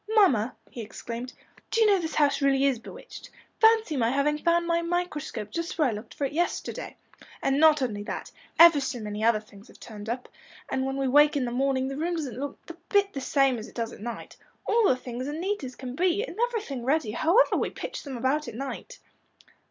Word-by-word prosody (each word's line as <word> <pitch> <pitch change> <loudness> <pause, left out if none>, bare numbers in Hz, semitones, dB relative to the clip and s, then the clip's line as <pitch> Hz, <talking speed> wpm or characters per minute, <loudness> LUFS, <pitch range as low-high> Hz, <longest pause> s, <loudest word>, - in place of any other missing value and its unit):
"Mamma," 260 - +4 0.2
he 240 - -6
exclaimed, 235 +3 -7 0.4
"do 455 - 0
you 445 - +6
know 405 -2 +4
this 320 -2 -4
house 290 -1 +2
really 275 0 +3
is 265 -4 +2
bewitched? - - -11 0.3
Fancy 445 -7 +4
my 230 -4 +2
having 285 +3 +1
found 340 +1 +2
my 335 0 +1
microscope 335 - -3
just 335 0 -4
where 305 -4 +3
I - - 0
looked 215 +1 -8
for 285 - -1
it 275 - -4
yesterday. 345 +3 -2 0.5
And 270 +1 +2
not 310 -3 +6
only 210 -5 -2
that, - - -5 0.3
ever 335 -3 +8
so 265 -2 -3
many 210 0 -5
other 225 -1 +4
things 210 0 -16
have - - -18
turned 215 -1 -9
up. 250 +2 -3 0.4
And 265 0 0
when 270 0 -3
we 270 -1 0
wake 295 +3 +5
in 265 - 0
the 240 - -3
morning 265 +1 +1
the 275 0 -4
room 340 +3 -1
doesn't 265 -7 -4
look 285 0 -4
a - - -6 0.2
bit 400 -1 +2
the 275 - -4
same 270 -2 +2
as 220 - -8
it - - -16
does 230 -1 -3
at - - -12
night. 235 +1 -7 0.3
All 450 -2 +3
our - - +4
things 250 +1 -6
are 290 - -3
as - - -4
neat 395 0 -2
as 255 -1 -6
can 255 -1 -7
be, 365 +5 +1
and - - -7
everything 415 - -4
ready, 270 -3 +1
however 340 - +3
we - - 0
pitch - - -6
them 275 -4 -6
about 275 +5 0
at 235 - -7
night." 275 - -6
275 Hz, 230 wpm, -27 LUFS, 245-335 Hz, 0.5 s, ever